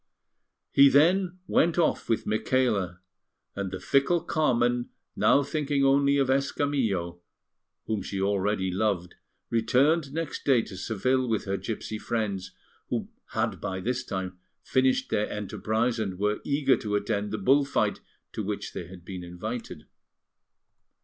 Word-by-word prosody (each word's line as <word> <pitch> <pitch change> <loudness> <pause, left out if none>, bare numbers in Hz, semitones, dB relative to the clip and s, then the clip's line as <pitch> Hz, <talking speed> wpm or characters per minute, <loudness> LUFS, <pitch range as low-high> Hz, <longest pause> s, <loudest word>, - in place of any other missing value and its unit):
He 140 0 +7
then 180 +6 +3
went 170 -2 +2
off 170 -3 +1
with 115 - +1
Micaela; 105 -5 0 0.5
and 100 -1 -3
the 95 0 -5
fickle 140 - +2
Carmen, 120 -7 +1 0.3
now 140 - +4
thinking 140 -1 0
only 140 +1 +4
of 135 -2 +2
Escamillo, 130 -10 0 0.6
whom 110 -2 -1
she 95 +1 -4
already 100 -1 0
loved, 95 -2 -1 0.4
returned 135 +7 +2
next 160 0 -4
day 130 -5 +4
to 95 - -9
Seville 125 +7 0
with 110 -2 0
her 95 -1 -1
gipsy 105 +2 -4
friends, 100 -6 -2 0.4
who - - -2 0.2
had - - -1
by 95 0 -3
this 125 +6 -2
time 95 -5 -5 0.2
finished 130 +3 +1
their 105 -1 +1
enterprise 110 +3 -1
and 95 -4 -2
were 105 +2 0
eager 140 -2 +2
to 105 -1 -2
attend 105 0 -1
the 110 - -3
bull 135 +8 +4
fight 140 - 0 0.3
to - - -4
which - - -4
they 85 - -6
had 90 -1 -12
been 95 -2 -6
invited. 90 -1 -6
110 Hz, 145 wpm, -27 LUFS, 95-140 Hz, 0.6 s, He